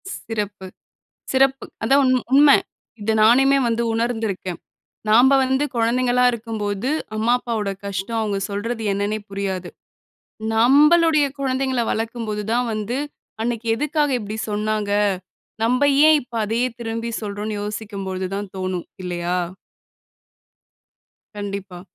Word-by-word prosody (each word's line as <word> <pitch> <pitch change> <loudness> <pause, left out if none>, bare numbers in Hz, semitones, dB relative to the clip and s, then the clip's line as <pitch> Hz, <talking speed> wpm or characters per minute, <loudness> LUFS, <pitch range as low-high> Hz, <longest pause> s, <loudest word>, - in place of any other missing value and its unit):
சிறப்பு, 205 -3 -5 0.7
சிறப்பு. 270 0 +2 0.2
அதான் 270 +5 +4
உண் 255 -1 +4 0.2
உண்மை. 285 +1 +7 0.4
இத 215 +2 0
நானுமே 270 +5 +5
வந்து 235 0 0
உணர்ந்துருக்கேன். 225 -6 -2 0.5
நாம்ப 245 +5 +6
வந்து 265 +2 +1
குழந்தைங்களா 245 +2 +2
இருக்கும்போது, 220 -1 -3 0.3
அம்மா 225 +3 +2
அப்பாவோட 220 -5 -2
கஷ்டம், 200 +3 -3
அவங்க 205 -2 -1
சொல்றது 225 +3 -3
என்னன்னே 205 +2 -1
புரியாது. 190 -2 -3 0.9
நம்பளுடைய 300 +6 +5
குழந்தைங்கள 260 -2 0
வளர்க்கும்போது 220 -2 -3
தான் 245 +1 +1
வந்து, 215 +4 -2 0.4
அன்னைக்கு 235 0 -2
எதுக்காக 295 +2 0
இப்படி 210 0 -5
சொன்னாங்க? 210 0 -1 0.7
நம்ப 250 +4 +2 0.3
ஏன் 310 -1 +6
இப்ப 240 -1 -17
அதையே 230 +4 0
திரும்பி 230 0 -3
சொல்றோம்ன்னு 210 0 -4
யோசிக்கும்பொழுது 200 -3 -4
தான் 200 -1 -4
தோணும், 185 -2 -3 0.2
இல்லையா? 175 0 -2 2.0
கண்டிப்பா. 200 -3 -6
225 Hz, 110 wpm, -21 LUFS, 205-250 Hz, 2.0 s, உண்மை